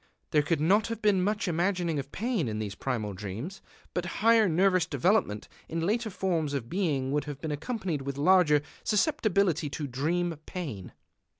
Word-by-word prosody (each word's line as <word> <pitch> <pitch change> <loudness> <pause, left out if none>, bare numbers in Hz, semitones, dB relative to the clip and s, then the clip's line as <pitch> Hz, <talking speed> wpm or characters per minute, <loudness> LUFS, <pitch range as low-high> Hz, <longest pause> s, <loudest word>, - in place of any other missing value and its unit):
There 150 - +4
could 150 +2 0
not 195 +8 +3
have 230 -1 -4
been 205 -4 +3
much 205 +1 0
imagining 175 -2 0
of 140 +1 -6
pain 220 - -1
in 105 -1 -3
these 105 -2 -3
primal 110 -3 -3
dreams. 105 - -6 0.3
But 175 0 -2 0.2
higher 225 -3 +6
nervous 185 +1 +3
development 145 - +1 0.2
in 165 0 -1
later 220 +4 0
forms 170 -7 -1
of 120 -4 -4
being 145 -8 0
would 150 +1 0
have 145 -2 -6
been 155 0 -4
accompanied 175 - -3
with 140 0 -4
larger 150 -2 +4 0.2
susceptibility 200 - +1
to 145 +1 -4
dream 160 +6 -1
pain. 140 - -6
165 Hz, 170 wpm, -29 LUFS, 140-195 Hz, 0.3 s, higher